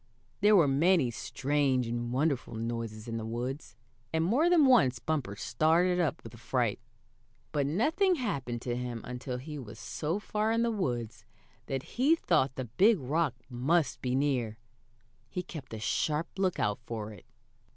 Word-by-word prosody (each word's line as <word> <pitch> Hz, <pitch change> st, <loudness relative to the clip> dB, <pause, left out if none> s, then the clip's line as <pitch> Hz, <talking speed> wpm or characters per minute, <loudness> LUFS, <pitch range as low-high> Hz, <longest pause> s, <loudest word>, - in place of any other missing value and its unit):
There 210 Hz, +1 st, +6 dB
were 170 Hz, -7 st, +6 dB
many 145 Hz, -1 st, +3 dB
strange 135 Hz, +1 st, 0 dB
and 120 Hz, +1 st, -3 dB
wonderful 135 Hz, -2 st, 0 dB
noises 115 Hz, -1 st, -4 dB
in 115 Hz, 0 st, -3 dB
the 115 Hz, -, -4 dB
woods, 120 Hz, +3 st, -4 dB, 0.4 s
and 160 Hz, 0 st, +1 dB
more 270 Hz, -, +3 dB
than 335 Hz, -5 st, +6 dB
once 225 Hz, -, +5 dB
Bumper 130 Hz, -7 st, -2 dB
started 170 Hz, -, +2 dB
up 170 Hz, -4 st, 0 dB
with 115 Hz, 0 st, -11 dB
fright. 120 Hz, -2 st, 0 dB, 0.7 s
But 145 Hz, -2 st, 0 dB
nothing 320 Hz, -, +2 dB
happened 135 Hz, -, -3 dB
to 120 Hz, -1 st, -2 dB
him 120 Hz, -2 st, -4 dB
until 125 Hz, +1 st, -5 dB
he 150 Hz, +3 st, -7 dB
was 110 Hz, -4 st, -9 dB
so 150 Hz, -, -3 dB
far 210 Hz, +1 st, -1 dB
in 230 Hz, +1 st, +2 dB
the 235 Hz, -, +1 dB
woods 120 Hz, -, -3 dB, 0.4 s
that 135 Hz, -1 st, -2 dB, 0.2 s
he 290 Hz, +6 st, +5 dB
thought 150 Hz, -, +1 dB
the 130 Hz, -, -3 dB
big 195 Hz, -, +4 dB
rock 145 Hz, +1 st, 0 dB
must 135 Hz, +5 st, +1 dB
be 125 Hz, 0 st, 0 dB
near. 130 Hz, -6 st, 0 dB, 0.7 s
He 180 Hz, -1 st, -3 dB
kept 155 Hz, -4 st, -9 dB
a 110 Hz, -, -5 dB
sharp 150 Hz, +8 st, 0 dB
lookout 180 Hz, -, +1 dB
for 110 Hz, -2 st, -4 dB
it. 105 Hz, -, -15 dB
135 Hz, 160 wpm, -30 LUFS, 120-175 Hz, 0.7 s, There